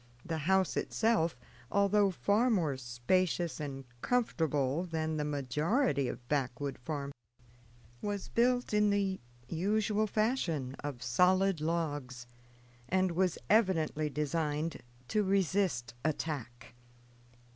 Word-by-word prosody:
The 165 -2 -2
house 190 -1 +3
itself, 220 - +1 0.3
although 200 0 +4
far 205 +6 +2
more 165 - +1
spacious 155 +8 0
and 135 -2 -5 0.2
comfortable 160 - +1
than 160 -3 -2
the 150 - 0
majority 150 - +1
of 120 - -6
backwood 135 -1 -2
farmhouses, 140 +1 -4 0.9
was 205 -2 -3
built 245 0 +1
in 210 0 +4
the 200 -2 0 0.3
usual 210 +6 +1
fashion, 185 - 0
of 135 -4 -5
solid 180 +7 +3
logs, 145 -6 -2 0.6
and 185 0 +2
was 180 0 +1
evidently 165 -8 +2
designed 150 +1 -2 0.3
to 215 - +2
resist 190 -10 +1
attack. 140 -5 -3
165 Hz, 105 wpm, -32 LUFS, 145-200 Hz, 0.9 s, although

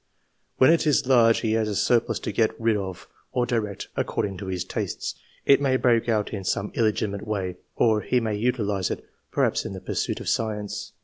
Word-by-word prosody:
When 130 +5 +6
it 165 -1 +1
is 145 -1 +3
large, 120 -3 +5
he 110 - 0
has 110 -1 +1
a 105 - -2
surplus 115 +3 +2
to - - -3
get 110 -1 +1
rid 115 -1 +2
of, 95 -3 -5 0.2
or 125 - +1
direct, 110 -5 -2
according 100 -2 -1
to 95 +1 -7
his 90 -2 -2
tastes. 95 - -3 0.3
It 140 - +6
may 130 -2 +3
break 120 -2 +2
out 110 -2 0
in 100 -2 -4
some 100 +2 -1
illegitimate 110 -2 0
way, 95 -4 -2 0.2
or 110 -2 +3
he 125 - +1
may 110 -3 -1
utilise 105 -4 0
it, - - -5 0.2
perhaps - - +1
in - - -5
the 95 - -6
pursuit - - -2
of - - -8
science. 105 -2 -2
110 Hz, 200 wpm, -25 LUFS, 100-120 Hz, 0.3 s, When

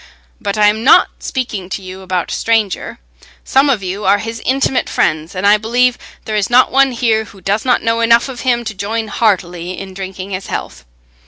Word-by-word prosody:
But 200 +1 -3
I 210 - +4
am 215 +2 +2
not 265 - +6
speaking 215 -8 -4
to 195 - -5
you 185 +1 -9
about 185 -2 -2
a - - -2
stranger; 220 -4 -1 0.5
some 275 +2 +3
of 230 -8 +1
you 190 +3 -4
are 195 +1 +4
his 225 +2 -6
intimate 265 0 0
friends, 155 +4 -1
and 185 +2 -2
I 205 +1 +6
believe 245 +3 +1 0.3
there 215 - -3
is 205 -2 0
not 245 +1 +4
one 270 0 +4
here 230 -3 +1
who 200 - -15
does 200 +5 -1
not 250 - +2
know 230 0 +1
enough 230 +2 +4
of 260 -3 -8
him 240 -2 +1
to 220 -2 -5
join 215 +3 -3
heartily 180 -5 -1
in 195 -1 -8
drinking 190 0 -7
his 190 0 -5
health." 60 0 -6
215 Hz, 210 wpm, -16 LUFS, 190-235 Hz, 0.5 s, not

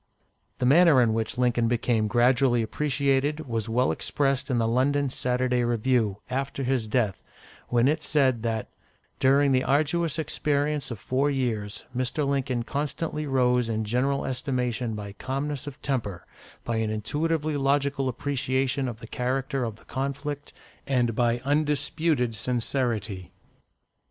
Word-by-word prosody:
The - - -1
manner 155 +1 +6
in 115 -3 +3
which 110 0 -2
Lincoln 120 -2 +2
became 115 -2 +1
gradually 120 +1 +3
appreciated 140 +3 0
was 115 -2 -2
well 125 +3 +2
expressed 140 -1 -1
in 125 - +1
the 115 -1 +2
London 135 +4 +2
"Saturday 125 0 0
Review," 120 -3 +1
after 135 +1 -3
his 125 -3 0
death, 105 -3 0 0.5
when 120 +1 +3
it 155 +2 +1
said 135 -7 +2
that, 110 -1 -2 0.5
"during 140 +1 +4
the 130 -1 +3
arduous 155 +3 +1
experience 150 -2 -1
of 120 - -5
four 130 +8 0
years, 115 -7 -2
Mr. 130 +3 0
Lincoln 135 -3 0
constantly 150 +3 -3
rose 125 -3 +2
in 110 -1 -1
general 130 +5 0
estimation 125 -3 -2
by 100 -1 -6
calmness 135 +5 -4
of 140 - -7
temper, 105 -10 -2 0.4
by 115 -1 -2
an 110 -1 0
intuitively 150 +8 -1
logical 140 -1 +1
appreciation 130 0 -1
of 115 -3 -6
the - - -8
character 130 +1 -1
of 115 -3 -3
the - - -21
conflict, 140 +1 -4 0.4
and 125 -4 +1
by 120 +1 +1
undisputed 145 -2 +1
sincerity." 115 -5 -2
130 Hz, 140 wpm, -26 LUFS, 120-140 Hz, 0.5 s, manner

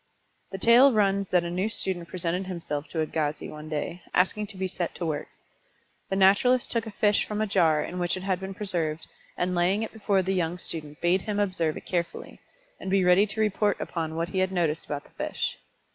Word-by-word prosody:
The 195 - -4
tale 240 +7 +7
runs 200 -3 +2
that 180 -1 +3
a 170 - -4
new 185 +5 0
student 185 -5 -2
presented 180 +1 -2
himself 165 -5 -4
to 160 - -2
Agassiz 155 -1 -2
one 155 0 -9
day, 155 +3 -3
asking 205 +3 +2
to 200 - -10
be 190 0 -1
set 175 -2 -4
to 175 - -4
work. 150 -2 -2 0.8
The 195 - 0
naturalist 200 +6 +4
took 230 -1 -1
a - - -3
fish 205 0 +2
from 210 0 -4
a 215 - +2
jar 165 -7 +3
in 180 - -5
which 175 +1 0
it 185 - -7
had 190 -2 0
been 190 0 -6
preserved, 165 -6 -2 0.3
and 180 +1 0
laying 180 +5 +2
it 225 - -6
before 200 -3 +1
the 190 +1 0
young 175 -1 0
student 150 -4 -4
bade 175 +2 +3
him 205 0 -2
observe 185 -6 0
it - - -10
carefully, 170 -2 -3 0.4
and - - -5
be 190 -1 +3
ready 180 +4 +5
to 220 +2 -3
report 210 -1 +1
upon 160 -2 -3
what 165 +1 -1
he 190 - -1
had 185 0 +1
noticed 165 -4 0
about 145 -1 -4
the - - -21
fish. - - -3
185 Hz, 220 wpm, -27 LUFS, 170-200 Hz, 0.8 s, tale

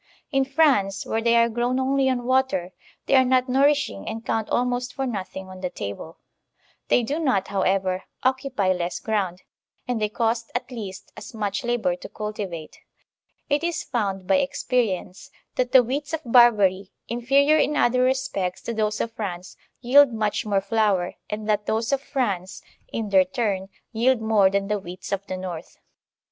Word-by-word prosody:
In 270 -2 +2
France, 265 -10 +2
where 225 - -1
they 235 0 +3
are 235 0 +5
grown 240 +2 -1
only 265 0 +2
on 245 -2 -1
water, 255 -9 +1 0.3
they - - 0
are 260 -1 +7
not 255 0 +2
nourishing 270 - +1
and 225 +1 -5
count 220 -1 -1
almost 245 0 -1
for 270 - -2
nothing 190 -5 -5
on 185 0 -11
the 180 - -2
table; 100 - -7 0.7
they 245 - +3
do 285 +8 -2
not, 250 - +1
however, 190 -1 0 0.2
occupy 260 -7 +1
less 175 -1 -3
ground, 190 -5 -2 0.4
and 245 -3 -1
they 210 - +1
cost 230 +1 -1
at 245 - -3
least 200 -6 -7
as - - -10
much 205 -2 -2
labor 240 +2 0
to 275 - -10
cultivate. 200 -7 -6 0.7
It 290 +2 +1
is 340 -1 -1
found 195 -6 -2
by 280 - +3
experience 230 -9 -1 0.2
that 250 -1 -1
the 260 -2 +7
wheats 275 +5 -3
of 320 - -1
Barbary, 210 -6 +4 0.2
infetior 275 +6 +3
in 300 - -1
other 250 +1 +3
respects 255 -8 -1
to 235 - -3
those 215 -1 -1
of 230 - -2
France, 185 -5 -6 0.3
yield 270 +2 +6
much 215 -1 -1
more 200 -2 +2
flour, 200 -3 +1 0.2
and 210 0 -4
that 210 -1 0
those 225 +4 0
of 275 - +1
France, 200 -10 -3 0.2
in 220 -2 -4
their 190 -1 +6
turn, 205 -7 -2 0.2
yield 245 +2 +2
more 220 -3 +4
than 195 0 -1
the 210 0 0
wheats 180 0 -9
of 200 0 -2
the 185 - -4
north. 175 -3 -7
225 Hz, 175 wpm, -24 LUFS, 195-255 Hz, 0.7 s, are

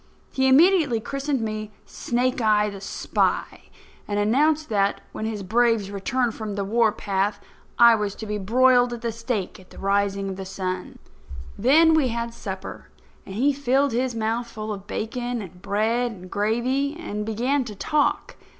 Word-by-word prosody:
He 265 0 +1
immediately 300 -3 +5
christened 275 +3 -2
me 215 -1 -4 0.2
Snake 250 +1 -1
eye, 210 -1 +3
the 195 -1 -9
Spy, - - -2 0.4
and 205 - -2
announced 295 +9 +2
that, 200 -2 +1
when 220 - -5
his 215 -3 -4
braves 225 0 +2
returned 235 +4 -1
from 215 -2 -5
the 200 - -2
warpath, 205 -2 0 0.4
I 235 -1 +8
was 210 -3 -1
to 220 - -7
be 210 0 -3
broiled 245 +4 +4
at 235 - -7
the 235 -1 -2
stake 230 -5 -4
at 185 - -18
the - - -15
rising 200 0 0
of 190 - -5
the 195 - -5
sun. 185 -1 -5 0.6
Then 320 +7 +5
we 310 -4 +3
had 235 0 -3
supper; 190 -4 -7 0.4
and 190 - -7
he 275 +6 +2
filled 275 +1 +1
his 245 +1 -1
mouth 225 +2 -1
full 215 -2 -5
of 200 0 -9
bacon 245 +2 -3
and 180 -3 -10
bread 225 +5 0
and 185 -4 -11
gravy, 250 +8 0
and 210 -11 -4
began 245 +6 0
to 215 -3 -7
talk. 295 +9 0
225 Hz, 170 wpm, -24 LUFS, 205-255 Hz, 0.6 s, I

